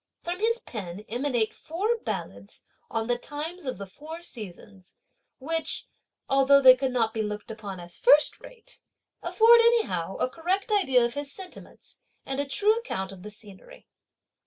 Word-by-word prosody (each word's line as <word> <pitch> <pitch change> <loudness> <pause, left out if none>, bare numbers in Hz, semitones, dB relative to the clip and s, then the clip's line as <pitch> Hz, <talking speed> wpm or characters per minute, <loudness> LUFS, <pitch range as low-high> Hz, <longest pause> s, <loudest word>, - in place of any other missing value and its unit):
From 350 +1 -3
his 460 +2 +2
pen 200 - -7
emanate 240 -1 0
four 395 +9 -1
ballads - - -6 0.3
on 225 -1 -2
the 240 +1 0
times 305 +4 -6
of 255 - -3
the 200 - -6
four 305 - -10
seasons, 200 - -10 0.4
which, 325 +4 -2 0.4
although 275 +1 +5
they 260 -2 +9
could 260 0 -1
not 230 -3 +1
be 220 - -1
looked 210 +1 -5
upon 205 -4 -7
as 175 0 -8
first 290 +4 +5
rate, 470 -3 -11 0.4
afford 465 +1 +6
anyhow 440 - +2
a - - 0
correct 365 - -2
idea 265 - +4
of 235 - -3
his 285 +1 -4
sentiments, 370 +3 -11 0.3
and 270 0 -3
a 285 - -1
true 420 +9 +3
account 190 - -4
of 190 -2 -11
the 210 - -8
scenery. 205 -2 -13
270 Hz, 160 wpm, -27 LUFS, 215-345 Hz, 0.4 s, they